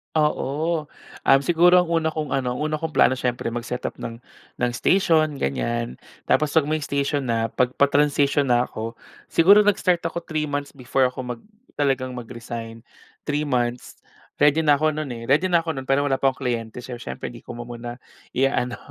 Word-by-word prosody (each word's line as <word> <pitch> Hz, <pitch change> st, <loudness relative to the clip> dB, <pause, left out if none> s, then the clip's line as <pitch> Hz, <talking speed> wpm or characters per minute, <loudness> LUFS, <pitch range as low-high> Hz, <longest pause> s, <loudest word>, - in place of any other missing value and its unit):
Oo. 155 Hz, +1 st, 0 dB, 0.4 s
Um, 135 Hz, 0 st, +6 dB
siguro 175 Hz, +3 st, +5 dB
ang 170 Hz, -, -8 dB
una 165 Hz, -1 st, +2 dB
kong 155 Hz, -3 st, -4 dB
ano, 125 Hz, -2 st, -1 dB
ang -, -, -5 dB
una 155 Hz, 0 st, -1 dB
kong 160 Hz, -1 st, -4 dB
plano 125 Hz, -, +5 dB
siyempre 125 Hz, -2 st, -2 dB
mag-setup 120 Hz, +1 st, -4 dB
ng 115 Hz, +1 st, -7 dB, 0.4 s
ng 120 Hz, 0 st, +2 dB
station, 155 Hz, +2 st, +2 dB
ganyan. 120 Hz, -, -2 dB, 0.2 s
Tapos 150 Hz, -1 st, +1 dB
'pag 160 Hz, -, +5 dB
may 155 Hz, 0 st, +1 dB
station 140 Hz, -1 st, -1 dB
na, 115 Hz, -1 st, 0 dB
'pag 125 Hz, 0 st, 0 dB
pa-transition 145 Hz, 0 st, +3 dB
na 120 Hz, -1 st, +3 dB
ako 115 Hz, -1 st, -6 dB, 0.3 s
siguro 195 Hz, +5 st, +6 dB
nag-start 185 Hz, -3 st, +2 dB
ako, 170 Hz, +1 st, -5 dB
3 155 Hz, -2 st, -2 dB
months 145 Hz, 0 st, -3 dB
before 130 Hz, 0 st, 0 dB
ako 130 Hz, -, -11 dB, 0.2 s
mag 115 Hz, -, -21 dB, 0.4 s
talagang 135 Hz, -3 st, 0 dB
mag-resign. 115 Hz, -1 st, -7 dB, 0.5 s
3 150 Hz, +1 st, 0 dB
months, 125 Hz, -3 st, -2 dB, 0.4 s
ready 150 Hz, +2 st, +4 dB
na 145 Hz, -2 st, +5 dB
ako 155 Hz, 0 st, +1 dB
no'n 155 Hz, -2 st, -3 dB
eh, 115 Hz, -1 st, -8 dB
ready 150 Hz, +7 st, +4 dB
na 170 Hz, -, +5 dB
ako 160 Hz, -2 st, -3 dB
no'n, 130 Hz, -, -5 dB
pero 135 Hz, +1 st, +3 dB
wala 135 Hz, -, +2 dB
pa 135 Hz, 0 st, +3 dB
akong 130 Hz, -, -19 dB
kliyente. 115 Hz, -1 st, -3 dB
So, 125 Hz, 0 st, -7 dB
siyempre 120 Hz, -, -6 dB
hindi 120 Hz, -1 st, -12 dB
ko -, -, -7 dB
muna 120 Hz, 0 st, -7 dB, 0.3 s
ia-ano, 125 Hz, -2 st, 0 dB
135 Hz, 185 wpm, -23 LUFS, 120-155 Hz, 0.5 s, Um